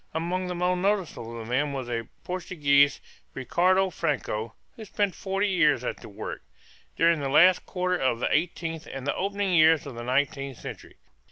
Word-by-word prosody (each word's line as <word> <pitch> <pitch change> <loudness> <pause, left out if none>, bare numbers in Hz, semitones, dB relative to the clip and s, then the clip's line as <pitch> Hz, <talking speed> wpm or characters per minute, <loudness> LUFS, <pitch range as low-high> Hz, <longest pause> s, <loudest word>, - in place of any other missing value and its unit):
Among 180 +3 -2
the 180 - -3
most 180 +1 0
notable 180 - -2
of 110 0 -8
them 140 +3 0
was 130 -3 -4
a 115 -2 -3 0.2
Portuguese, 145 -6 +2 0.4
Ricardo 185 +8 +2
Franco, 115 -9 -2 0.2
who 225 - -9
spent 205 -2 -1
forty 195 +1 -1
years 155 - +3
at - - -3
the - - -12
work, 105 +1 -7 0.5
during 165 -1 +3
the 140 -1 -2
last 180 +6 +5
quarter 180 0 -1
of 130 -6 0
the - - +1
eighteenth 165 0 -2
and 135 -1 -6
the 145 - 0
opening 200 0 -1
years 160 -2 +5
of 140 - -7
the 120 - -7
nineteenth 135 +1 -1
centuries. - - -10
160 Hz, 175 wpm, -26 LUFS, 135-185 Hz, 0.5 s, last